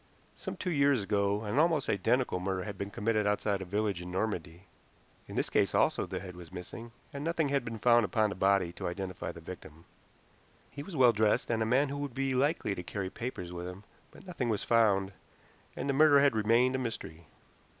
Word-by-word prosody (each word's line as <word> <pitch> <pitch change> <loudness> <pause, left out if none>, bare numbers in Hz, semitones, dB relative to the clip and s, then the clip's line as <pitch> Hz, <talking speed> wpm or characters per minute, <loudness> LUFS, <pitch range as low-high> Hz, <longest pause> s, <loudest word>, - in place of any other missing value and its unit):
Some - - -6
two 180 - -2
years 140 -6 +3
ago 100 +1 0
an 110 +6 0
almost 160 -3 +2
identical 115 +1 +1
murder 95 0 -2
had 105 -2 -6
been 100 +1 -5
committed 105 +1 0
outside 105 -1 0
a - - -5
village 100 -1 -1
in 90 - -7
Normandy. 90 -3 -3 0.6
In - - -8
this - - -1
case - - +2
also - - +2
the - - -4
head 90 -2 -9
was 90 -1 -11
missing, 95 +6 -8 0.2
and 140 0 -5
nothing 165 -2 0
had 140 -2 +1
been 115 -1 -5
found 120 +1 +4
upon 105 +2 +1
the - - -5
body 95 -2 +2
to - - -5
identify 95 +1 -4
the 85 - -12
victim. 80 -1 -11 0.9
He 140 - -7
was 165 +4 -8
well 125 -4 +6
dressed, 110 +1 +1
and 115 -1 0
a 110 - +1
man 135 +4 +3
who 140 - -4
would 140 -4 -5
be 135 0 0
likely 135 -4 +1
to 90 - -5
carry 95 +1 -4
papers 90 -8 -5
with 90 0 -5
him, 90 +2 -9 0.3
but - - -16
nothing 165 -10 -3
was 105 -3 0
found, 100 -4 +3 0.6
and - - -4
the 140 - +1
murder 145 0 +6
had 140 -4 +4
remained 115 +4 +3
a 130 - 0
mystery. 85 -10 -6
110 Hz, 210 wpm, -31 LUFS, 95-130 Hz, 0.9 s, well